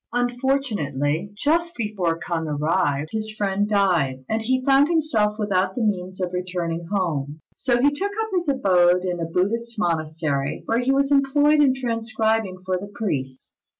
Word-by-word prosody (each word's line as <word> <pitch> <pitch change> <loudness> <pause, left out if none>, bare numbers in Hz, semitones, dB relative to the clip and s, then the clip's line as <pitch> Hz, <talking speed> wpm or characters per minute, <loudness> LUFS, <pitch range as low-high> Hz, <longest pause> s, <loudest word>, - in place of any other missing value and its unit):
Unfortunately, 225 - -1
just 335 +8 0
before 200 -7 -1
K'ung 170 -2 -3
arrived 150 0 0
his 220 0 -3
friend 205 0 0
died, 170 -11 +1
and 220 0 -1
he 255 +3 0
found 275 +1 +5
himself 295 -11 +1
without 190 -3 0
the 245 - -1
means 185 -3 -2
of 180 -1 -2
returning 175 -2 -3
home; 160 -7 -2
so 245 -2 0
he 285 +3 +4
took 390 +8 -2
up 445 0 -1
his 350 -2 0
abode 180 -8 +3
in 180 -1 -2
a 165 - -1
Buddhist 225 +8 -1
monastery, 155 -6 -1
where 230 +1 +1
he 250 +2 +1
was 275 +1 +2
employed 290 +2 +4
in 265 -3 +4
transcribing 225 -5 -1
for 185 -1 0
the 200 +2 -9
priests. 130 - -4
205 Hz, 160 wpm, -23 LUFS, 170-245 Hz, -, found